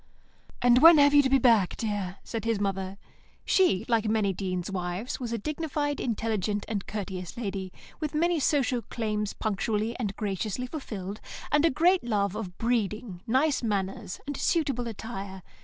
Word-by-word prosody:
"And 245 0 +6
when 325 +3 +9
have 285 0 +6
you 290 - +8
to 265 - +1
be 270 - +5
back, 230 -8 +3
dear?" 205 -4 -3
said 225 - -4
his 230 -2 0
mother. 195 -1 -2 0.5
She, 230 - +3
like 230 -3 +2
many 210 -3 +2
deans' 185 0 -3
wives, 180 +5 -3
was 240 -3 -4
a 230 - -1
dignified, 295 +3 -2
intelligent, 215 -3 -1
and 205 -3 -3
courteous 190 -3 -5
lady, 195 -5 -4 0.3
with 305 -1 -3
many 340 +1 +2
social 265 -4 +1
claims 210 -3 -2
punctually 215 +2 -1
and 205 -5 -2
graciously 210 +3 -2
fulfilled, 215 - -6 0.3
and 295 +2 +4
a - - +5
great 350 +6 +3
love 205 -4 0
of 195 -5 -6
breeding, 215 -5 -1
nice 265 +5 +2
manners, 200 -2 -2
and 285 0 -4
suitable 275 -7 0
attire. 195 -4 -6
220 Hz, 160 wpm, -28 LUFS, 195-260 Hz, 0.5 s, when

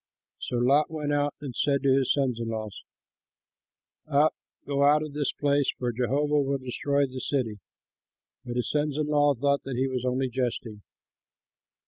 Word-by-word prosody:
So 125 - -3
Lot 140 +5 +3
went 150 -2 -2
out 145 0 0
and 135 -5 -6
said 140 -1 +1
to 135 -1 +4
his 135 -2 +2
sons 130 -5 0
in 115 - -3
law, 110 -1 -3 1.4
"Up, 150 +1 +3 0.3
go 140 -1 -1
out 150 +2 +5
of 150 -2 -7
this 145 -1 0
place, 145 -1 +1
for 125 -1 -1
Jehovah 145 +5 +1
will 140 0 0
destroy 140 +2 0
the 130 -1 -7
city." 120 -6 -1 0.8
But 120 - -6
his 125 - -1
sons 150 -1 0
in 155 - 0
law 145 -1 +3
thought 140 +3 +1
he 135 0 -1
was 130 -2 -3
only 130 +1 0
jesting. 120 -4 -3
140 Hz, 165 wpm, -27 LUFS, 125-145 Hz, 1.4 s, out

